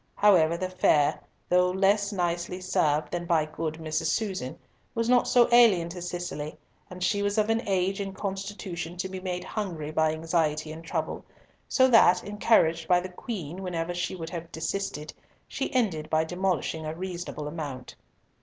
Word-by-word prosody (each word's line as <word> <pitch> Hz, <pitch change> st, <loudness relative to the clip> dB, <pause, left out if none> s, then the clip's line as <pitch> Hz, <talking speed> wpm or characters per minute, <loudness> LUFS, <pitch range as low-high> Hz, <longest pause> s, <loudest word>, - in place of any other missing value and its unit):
However, 170 Hz, -5 st, +4 dB
the 185 Hz, -, -2 dB
fare, 155 Hz, -5 st, +2 dB, 0.3 s
though 180 Hz, 0 st, +4 dB
less 200 Hz, +2 st, +2 dB
nicely 175 Hz, -1 st, -2 dB
served 150 Hz, -5 st, +1 dB
than 175 Hz, 0 st, -3 dB
by 160 Hz, -3 st, +3 dB
good 155 Hz, 0 st, -4 dB
Mrs. 160 Hz, 0 st, -2 dB
Susan, 185 Hz, -, -2 dB, 0.4 s
was 230 Hz, 0 st, 0 dB
not 245 Hz, 0 st, +4 dB
so 245 Hz, -2 st, +5 dB
alien 215 Hz, -8 st, +6 dB
to 175 Hz, +1 st, -7 dB
Cicely, 175 Hz, -4 st, -5 dB, 0.3 s
and 180 Hz, 0 st, -6 dB
she 205 Hz, +2 st, +1 dB
was 205 Hz, +1 st, 0 dB
of 215 Hz, +1 st, +3 dB
an 225 Hz, +1 st, +1 dB
age 195 Hz, 0 st, +1 dB
and 195 Hz, -1 st, -5 dB
constitution 195 Hz, -3 st, -5 dB
to 190 Hz, -, -2 dB
be 190 Hz, 0 st, -6 dB
made 180 Hz, -1 st, -4 dB
hungry 170 Hz, -8 st, -4 dB
by 155 Hz, 0 st, +2 dB
anxiety 155 Hz, -1 st, -1 dB
and 160 Hz, +1 st, -9 dB
trouble, 165 Hz, -1 st, -3 dB, 0.5 s
so 260 Hz, -1 st, +5 dB
that—encouraged 185 Hz, -6 st, +4 dB
by 180 Hz, -1 st, +5 dB
the 185 Hz, +1 st, -6 dB
Queen 180 Hz, -3 st, -6 dB
whenever 175 Hz, -2 st, -3 dB
she 175 Hz, +1 st, -2 dB
would 165 Hz, -2 st, -6 dB
have 170 Hz, -1 st, -6 dB
desisted—she 160 Hz, -2 st, -5 dB
ended 190 Hz, -12 st, 0 dB
by 155 Hz, 0 st, +2 dB
demolishing 180 Hz, -2 st, -1 dB
a 155 Hz, +1 st, -4 dB
reasonable 175 Hz, -4 st, -5 dB
amount. 145 Hz, -5 st, -6 dB
175 Hz, 165 wpm, -27 LUFS, 160-195 Hz, 0.5 s, alien